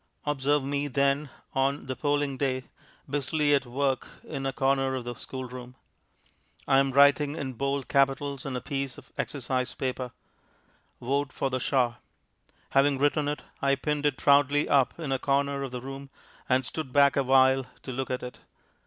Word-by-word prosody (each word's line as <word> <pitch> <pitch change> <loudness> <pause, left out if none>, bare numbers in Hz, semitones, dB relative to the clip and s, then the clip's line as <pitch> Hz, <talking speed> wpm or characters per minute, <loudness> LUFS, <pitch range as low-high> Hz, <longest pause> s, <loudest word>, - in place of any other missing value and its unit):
Observe 145 0 +1
me, 140 +1 -1
then, 140 +1 +1 0.2
on 135 +2 0
the 130 0 -4
polling 145 -1 0
day, 130 -1 -1 0.4
busily 145 +1 +1
at 135 -2 +2
work 135 +1 -1 0.2
in 135 0 -4
a - - 0
corner 135 0 +1
of 130 - -3
the 120 0 -5
schoolroom. 125 0 -8 0.9
I 135 -1 +5
am 135 0 +2
writing 145 +2 +5
in 135 -4 -4
bold 140 +2 -2
capitals 140 0 +1
on 135 -2 -4
a 125 - -3
piece 135 -1 -3
of - - -15
exercise 130 -2 -2
paper, 130 -1 -3 0.9
"Vote 140 +2 -1
for 135 - -2
the 130 - 0
shah." 125 -2 +1 0.7
Having 140 0 +4
written 145 +1 +2
it, 150 0 -3 0.2
I 140 0 +3
pinned 150 +1 0
it 140 -2 -1
proudly 145 +1 +4
up 140 +3 +2
in 155 -5 -3
a 135 - +1
corner 140 +1 0
of 135 - -3
the 125 0 -6
room, 135 +1 -8 0.4
and 130 0 +3
stood 155 -5 -5
back 140 0 +5
awhile 130 -1 +4 0.2
to 130 - -6
look 130 +1 -3
at 125 - -2
it. 125 - -8
135 Hz, 170 wpm, -28 LUFS, 130-140 Hz, 0.9 s, I